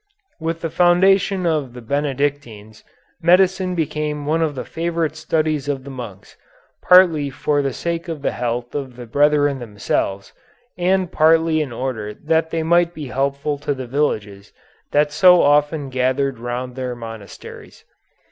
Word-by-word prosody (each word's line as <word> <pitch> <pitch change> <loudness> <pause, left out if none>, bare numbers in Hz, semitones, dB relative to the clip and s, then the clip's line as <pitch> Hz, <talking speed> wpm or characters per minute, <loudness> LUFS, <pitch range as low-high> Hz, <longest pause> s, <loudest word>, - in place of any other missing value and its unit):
With 165 0 -3
the 165 - -3
foundation 185 +2 +3
of 150 -7 -1
the 125 - -9
Benedictines, 140 -5 -3 0.4
medicine 185 +1 +3
became 150 -2 -2
one 160 +3 0
of 155 -3 0
the 130 - -5
favorite 165 -2 -2
studies 155 -3 -1
of 135 -2 -2
the 140 - -9
monks, 120 -7 -9 0.5
partly 170 -6 +5
for 145 +2 0
the 135 -1 -1
sake 170 +5 -4
of 160 -4 -6
the - - +1
health 120 0 -3
of 135 -4 -5
the 125 0 -9
brethren 145 +2 +2
themselves, 100 -3 -3 0.4
and 185 0 0
partly 160 0 +3
in 145 -4 -4
order 115 -4 -4
that 160 +1 0
they 165 0 -2
might 170 +1 +2
be 150 -4 -7
helpful 140 +2 -2
to 145 0 -2
the 130 -1 -6
villages 105 -7 -2 0.4
that 150 0 +2
so 180 +3 +6
often 145 0 +2
gathered 130 0 0
round 120 +1 -5
their 130 -2 -4
monasteries. 115 -4 -11
145 Hz, 150 wpm, -20 LUFS, 125-165 Hz, 0.5 s, so